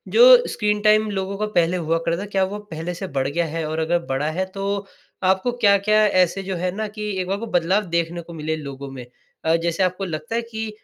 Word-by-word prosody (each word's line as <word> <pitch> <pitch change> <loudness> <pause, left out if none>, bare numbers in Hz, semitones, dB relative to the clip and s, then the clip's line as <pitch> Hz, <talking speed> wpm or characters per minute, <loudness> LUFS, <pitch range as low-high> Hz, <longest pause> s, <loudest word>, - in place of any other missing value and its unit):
जो 470 - +6 0.3
screen 210 -1 0
time 215 0 +4
लोगों 195 0 -3
का 215 - -1
पहले 175 +1 +3
हुआ 165 -1 0
था, 170 +4 0
क्या 195 -2 0
वो 205 +2 -3
पहले 175 -3 -6
से 190 +2 -5
बढ़ 135 0 +1
गया 170 +5 0
है? 160 0 -3
और 160 +1 -2
अगर 170 +2 +1
बढ़ा 135 +3 0
है 185 +4 -1
तो 200 +1 -2 0.4
आपको 190 +6 +2
क्या-क्या 215 -2 +4
ऐसे 185 0 +2
जो 190 0 -3
है 180 +1 -1
ना 215 +1 -2
कि 210 0 -5
एक 180 - -4
बार 195 +2 -1
वो 230 - -5
बदलाव 185 +5 +1
देखने 170 0 -1
को 170 +1 -12
मिले 160 0 -2
लोगों 140 -2 -7
में? 130 -2 -8 0.4
अ, 160 +1 +4
जैसे 170 +2 0
आपको 185 +1 -1
लगता 155 +4 -4
है 235 - +1
कि 225 -1 -5
185 Hz, 235 wpm, -22 LUFS, 165-205 Hz, 0.4 s, जो